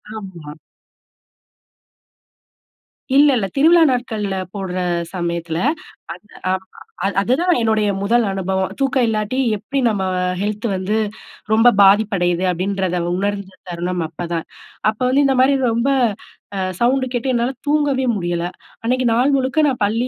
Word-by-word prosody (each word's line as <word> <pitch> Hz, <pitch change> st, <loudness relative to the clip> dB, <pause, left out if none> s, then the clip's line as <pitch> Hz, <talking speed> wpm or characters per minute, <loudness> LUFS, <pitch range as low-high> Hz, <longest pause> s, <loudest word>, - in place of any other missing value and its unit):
ஆமா. 175 Hz, -8 st, -8 dB, 2.6 s
இல்ல, 290 Hz, +1 st, +7 dB
இல்ல. 195 Hz, -3 st, -1 dB
திருவிழா 330 Hz, +4 st, +5 dB
நாட்கள்ல 220 Hz, -5 st, -2 dB, 0.2 s
போடுற 190 Hz, -2 st, -4 dB, 0.4 s
சமயத்தில, 170 Hz, -2 st, -3 dB, 0.6 s
அந்த, 210 Hz, -, -17 dB, 0.2 s
அ -, -, +2 dB, 0.5 s
அது 200 Hz, -, -1 dB
அதுதான் 335 Hz, -, +2 dB
என்னுடைய 220 Hz, -2 st, +1 dB
முதல் 230 Hz, +3 st, +2 dB
அனுபவம், 190 Hz, 0 st, -2 dB
தூக்கம் 270 Hz, -2 st, +2 dB
இல்லாட்டி 215 Hz, +3 st, -1 dB, 0.2 s
எப்பிடி 275 Hz, +7 st, -3 dB
நம்ம 205 Hz, -4 st, 0 dB, 0.4 s
ஹெல்த் 210 Hz, +2 st, -3 dB
வந்து 195 Hz, +4 st, -1 dB, 0.6 s
ரொம்ப 225 Hz, +2 st, +5 dB
பாதிப்படையுது, 195 Hz, -3 st, +3 dB
அப்பிடின்றத 185 Hz, 0 st, -1 dB, 0.2 s
உணர்ந்த 200 Hz, -1 st, -3 dB, 0.2 s
தருணம் 175 Hz, +1 st, -3 dB
அப்பதான், 170 Hz, 0 st, -4 dB, 0.4 s
அப்ப 215 Hz, -, -5 dB
வந்து 280 Hz, +2 st, +3 dB
இந்தமாரி 270 Hz, +1 st, +3 dB, 0.2 s
ரொம்ப 235 Hz, +4 st, +1 dB, 0.7 s
அ -, -, -1 dB, 0.2 s
சவுண்டு 260 Hz, +2 st, +2 dB
கேட்டு 245 Hz, +1 st, -2 dB
என்னால 240 Hz, +2 st, +1 dB
தூங்கவே 285 Hz, -3 st, +1 dB
முடியல, 175 Hz, -2 st, -2 dB, 0.4 s
அன்னக்கி 255 Hz, +2 st, 0 dB
நாள் 250 Hz, +4 st, +3 dB
முழுக்க 265 Hz, +3 st, 0 dB
நான் 260 Hz, -4 st, -1 dB
பள்ளி 225 Hz, +5 st, 0 dB
215 Hz, 125 wpm, -19 LUFS, 190-255 Hz, 2.6 s, இல்ல